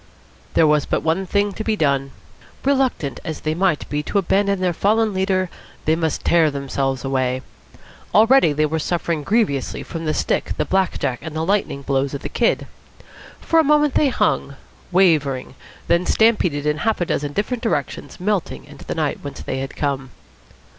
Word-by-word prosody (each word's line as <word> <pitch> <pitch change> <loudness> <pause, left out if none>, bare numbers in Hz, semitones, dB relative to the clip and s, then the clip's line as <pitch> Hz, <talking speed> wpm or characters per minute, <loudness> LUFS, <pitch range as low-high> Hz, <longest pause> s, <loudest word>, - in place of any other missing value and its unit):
There 160 - +5
was 150 -1 +2
but - - -1
one 170 +4 0
thing 205 +2 +1
to 220 - -5
be 220 0 0
done. 140 -6 +1 0.6
Reluctant 265 - +1
as 160 -2 -5
they 155 - -1
might 175 -2 0
be 150 0 -2
to 175 - -2
abandon 200 0 +2
their 180 -1 +1
fallen 215 +4 +2
leader, 190 -1 +1 0.4
they 155 - +3
must 160 -1 -2
tear 165 -2 +4
themselves 135 -2 -2
away. 130 -1 0 0.7
Already 225 - +5
they 150 +1 +1
were 160 +2 -1
suffering 170 -1 -1
grievously 195 - 0
from 165 -1 -6
the 155 - 0
stick, - - -1
the - - 0
black 190 -1 +1
jack, 130 -4 -2
and 160 0 -7
the 160 +1 -1
lightning 190 -7 0
blows 135 0 0
of 140 - -7
the - - -4
Kid. - - +1 0.8
For 330 - +3
a - - +5
moment 300 -1 +3
they 290 - +3
hung, 140 - 0 0.4
wavering; 155 -9 +2 0.3
then 170 +1 +2
stampeded 180 -10 +2
in 150 0 +1
half 220 +6 0
a 175 - 0
dozen 145 -3 -2
different 225 - -2
directions, 145 - -3
melting 180 - -2
into - - -13
the - - -4
night - - -1
whence - - -7
they - - -3
had 135 0 -5
come. 135 -2 -2
160 Hz, 180 wpm, -21 LUFS, 140-200 Hz, 0.8 s, There